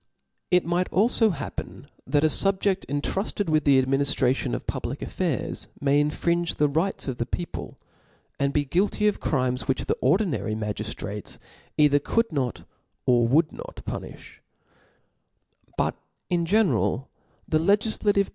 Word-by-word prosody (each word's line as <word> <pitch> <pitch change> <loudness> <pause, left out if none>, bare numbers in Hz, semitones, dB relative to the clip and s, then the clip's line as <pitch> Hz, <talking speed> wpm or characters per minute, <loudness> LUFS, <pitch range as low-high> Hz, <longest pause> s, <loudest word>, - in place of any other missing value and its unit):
It 180 -1 +3
might 175 +2 0
alfo 220 +2 +3
happen 140 -3 -6 0.2
that 145 +3 +2
a - - +6
fubjedl 195 +3 +2
intrufted 165 +6 -2
with 155 -1 +2
the 140 -2 +6
adminiftration 135 0 +1
of - - -6
public - - -4
affairs, - - -2
may 140 0 +3
infringe 170 +3 0
the 150 - +3
rights 160 +6 -1
of 130 -3 -4
the 120 - 0
people, 175 +6 -5 0.6
and 140 0 +1
be 145 0 +1
guilty 200 +8 +1
of 210 - +1
crimes 130 -3 -1
which 130 - 0
the - - +1
ordinary 140 - +1
magiftrates 105 -1 -5 0.4
either 145 -1 +5
could 230 +10 0
npt, 135 -7 -2 0.4
or 120 -2 +4
would 155 +6 +3
not - - -9
puni(h« - - -7 1.4
But, - - +1 0.4
in 170 -1 +1
genera), 190 - +2 0.4
the 155 - +2
legiflative. 205 +2 +2
150 Hz, 135 wpm, -25 LUFS, 135-190 Hz, 1.4 s, a